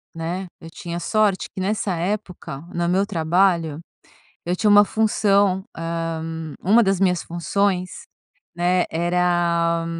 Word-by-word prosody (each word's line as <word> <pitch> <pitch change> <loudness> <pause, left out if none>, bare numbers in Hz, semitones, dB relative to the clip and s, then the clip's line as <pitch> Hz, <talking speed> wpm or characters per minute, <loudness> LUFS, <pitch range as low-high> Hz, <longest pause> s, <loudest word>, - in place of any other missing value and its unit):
né, 175 +3 -4
eu 165 - -10
tinha 170 +1 -6
sorte 210 +1 +1
que - - -7
nessa 200 -1 -1
época, 180 -6 -4
no 170 0 -1
meu 190 +3 +2
trabalho, 165 -3 +1 0.6
eu 175 +1 -1
tinha 210 +3 +1
uma 205 0 +8
função, 200 -3 +2
ah, 165 -1 -3 0.4
uma 220 +6 +5
das 195 -1 +1
minhas 180 -2 +2
funções, 180 +2 -2 0.5
né, 180 +1 +2
era 170 -1 +1
180 Hz, 125 wpm, -22 LUFS, 170-195 Hz, 0.6 s, uma